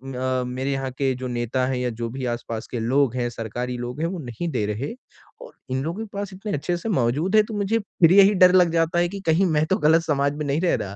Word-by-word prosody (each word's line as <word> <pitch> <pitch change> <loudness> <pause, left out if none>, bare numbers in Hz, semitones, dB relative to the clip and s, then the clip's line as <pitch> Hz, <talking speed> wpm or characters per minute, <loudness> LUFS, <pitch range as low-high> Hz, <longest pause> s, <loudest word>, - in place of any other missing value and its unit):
अ, 130 0 -1
मेरे 130 +2 -3
यहाँ 135 -1 -2
के 135 +1 0
जो 130 +1 -5
नेता 120 +1 -1
हैं 130 -1 -1
या 125 0 -1
जो 115 0 -4
भी 130 +2 -5
आस 120 0 -6
पास 115 -1 -4
के 120 - -3
लोग 130 +2 +1
हैं, 120 -1 -1
सरकारी 120 +2 -5
लोग 120 +3 -6
हैं 165 - +1
वो 180 +1 -5
नहीं 130 +4 -5
दे 115 -7 -1
रहे 105 - -3 0.5
और - - -11 0.2
इन 130 +1 -1
लोगों 170 +6 -4
के - - -13
पास 200 -1 -4
इतने 195 +3 -6
अच्छे 160 +5 -1
से 225 - -5
मौजूद 150 - +1
है 215 - +7
तो 220 - -8
मुझे 205 +3 +1
फिर 180 -5 +2
यही 200 +1 +7
डर 185 -1 +7
लग 180 -2 +5
जाता 165 +1 +1
है 175 0 +2
कि 200 +2 -6
कहीं 165 +4 +4
मैं 155 -3 +2
तो 190 +5 +1
गलत 160 -3 +4
समाज 140 -3 0
में 150 - -3
नहीं 145 +3 0
रह 180 - +2
रहा। 100 0 -6
140 Hz, 275 wpm, -23 LUFS, 125-175 Hz, 0.5 s, है